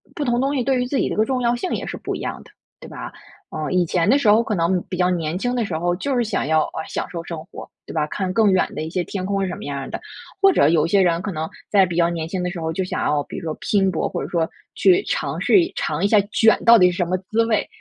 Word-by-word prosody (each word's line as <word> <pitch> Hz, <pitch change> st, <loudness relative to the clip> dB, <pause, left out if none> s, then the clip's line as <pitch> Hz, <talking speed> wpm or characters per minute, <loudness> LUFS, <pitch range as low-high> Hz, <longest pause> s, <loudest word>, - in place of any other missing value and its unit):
不 295 Hz, -, -2 dB
同 240 Hz, -1 st, +1 dB
东 275 Hz, +2 st, 0 dB
西 255 Hz, -, 0 dB
对 260 Hz, 0 st, +1 dB
于 250 Hz, -, 0 dB
自 275 Hz, -, -1 dB
己 -, -, +1 dB
的 -, -, -3 dB
个 215 Hz, -, +3 dB
重 255 Hz, +1 st, -1 dB
要 240 Hz, 0 st, +2 dB
性 360 Hz, +10 st, -4 dB
也 -, -, -3 dB
是 -, -, -5 dB
不 -, -, -4 dB
一 -, -, -6 dB
样 -, -, -5 dB
的， -, -, -19 dB, 0.3 s
对 -, -, -11 dB
吧？ -, -, -7 dB, 0.4 s
呃， 155 Hz, -1 st, -4 dB
以 180 Hz, -1 st, +2 dB
前 170 Hz, +1 st, 0 dB
的 265 Hz, -, +5 dB
时 280 Hz, -, 0 dB
候 215 Hz, +3 st, +5 dB
可 220 Hz, -, -3 dB
能 175 Hz, +1 st, +1 dB
比 180 Hz, -, -4 dB
较 180 Hz, 0 st, +2 dB
年 170 Hz, -2 st, -1 dB
轻 245 Hz, +5 st, -1 dB
的 240 Hz, -, 0 dB
时 170 Hz, -5 st, -3 dB
候， 175 Hz, +2 st, 0 dB
就 270 Hz, +9 st, -2 dB
是 245 Hz, -, +2 dB
想 210 Hz, -10 st, -2 dB
要， 160 Hz, 0 st, +3 dB
呃， 160 Hz, -, -6 dB
享 -, -, -4 dB
受 165 Hz, 0 st, -6 dB
生 165 Hz, -2 st, -7 dB
活， 190 Hz, -, -10 dB, 0.2 s
对 -, -, -9 dB
吧， 155 Hz, -2 st, 0 dB
看 185 Hz, +4 st, -3 dB
更 215 Hz, -1 st, +4 dB
远 185 Hz, -, +2 dB
的 -, -, -3 dB
一 160 Hz, -, -5 dB
些 180 Hz, +1 st, -1 dB
天 185 Hz, +1 st, -5 dB
空 195 Hz, 0 st, -1 dB
是 190 Hz, -, 0 dB
什 180 Hz, -, -4 dB
么 -, -, -9 dB
样 140 Hz, -1 st, -4 dB
儿 135 Hz, -, -6 dB
的。 -, -, -5 dB, 0.4 s
或 390 Hz, -1 st, +7 dB
者 145 Hz, -, +4 dB
有 160 Hz, -2 st, +3 dB
一 -, -, -3 dB
些 200 Hz, +1 st, +4 dB
人 170 Hz, -2 st, +2 dB
可 200 Hz, -, -4 dB
能 160 Hz, -2 st, -4 dB, 0.2 s
在 195 Hz, -2 st, +5 dB
比 175 Hz, -2 st, -5 dB
较 170 Hz, 0 st, +3 dB
年 165 Hz, -2 st, -3 dB
轻 180 Hz, +1 st, -3 dB
的 180 Hz, -, -1 dB
时 175 Hz, -, -6 dB
候 160 Hz, 0 st, -2 dB
就 190 Hz, -, -1 dB
想 185 Hz, -, -3 dB
要， 145 Hz, -1 st, +1 dB
比 -, -, -9 dB
如 -, -, -7 dB
说 160 Hz, -2 st, -3 dB
拼 195 Hz, -2 st, +1 dB
搏， 160 Hz, -, -1 dB
或 -, -, -4 dB
者 -, -, -6 dB
说 165 Hz, -2 st, 0 dB, 0.3 s
去 380 Hz, 0 st, +4 dB
尝 -, -, -2 dB
试 385 Hz, -, +5 dB
一 345 Hz, -, -4 dB
尝 155 Hz, +4 st, -2 dB
一 -, -, +4 dB
下 210 Hz, 0 st, +5 dB
卷 220 Hz, +1 st, +3 dB
到 235 Hz, 0 st, +8 dB
底 180 Hz, -3 st, +5 dB
是 175 Hz, -, -7 dB
什 175 Hz, -, +1 dB
么 185 Hz, +2 st, 0 dB
滋 225 Hz, +1 st, +3 dB
味， 220 Hz, -2 st, 0 dB
185 Hz, 345 characters per minute, -21 LUFS, 165-230 Hz, 0.4 s, 到